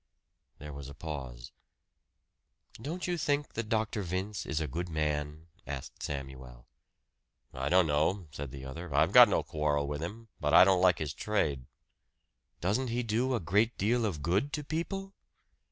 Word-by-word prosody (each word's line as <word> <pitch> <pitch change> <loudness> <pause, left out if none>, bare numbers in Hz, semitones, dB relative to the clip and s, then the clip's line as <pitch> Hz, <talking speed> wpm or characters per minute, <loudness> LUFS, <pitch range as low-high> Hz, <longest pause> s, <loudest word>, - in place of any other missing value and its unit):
There 75 0 -8
was 70 -1 -8
a 70 - -10
pause. 65 -7 -7 1.3
"Don't 165 +8 -4
you 175 -1 -1
think 145 -1 0
that 110 -1 -4
Dr. 110 -1 0
Vince 95 +1 -3
is 80 - -1
a 80 - -1
good 85 +6 -4
man?" 75 0 -2 0.2
asked 70 -1 -7
Samuel. 65 -4 -6 0.9
"I 65 +2 -2
don't 90 0 +5
know," 80 +5 +1
said 70 -1 -6
the 65 +1 -9
other. 80 +5 -7
"I've 75 +3 +4
got - - +9
no - - +1
quarrel 75 -2 0
with 75 +1 -3
him. 110 +7 -6
But 75 -1 +2
I 90 - +10
don't 95 -1 +4
like 90 -3 +5
his 75 -3 -3
trade." 75 -12 -1 1.0
"Doesn't 105 +9 +1
he 120 +1 -1
do 120 +4 +1
a - - 0
great 105 +7 +1
deal 115 +4 +2
of 80 -8 -4
good 100 - +1
to 150 - -2
people?" 195 +6 -4
85 Hz, 170 wpm, -31 LUFS, 75-110 Hz, 1.3 s, I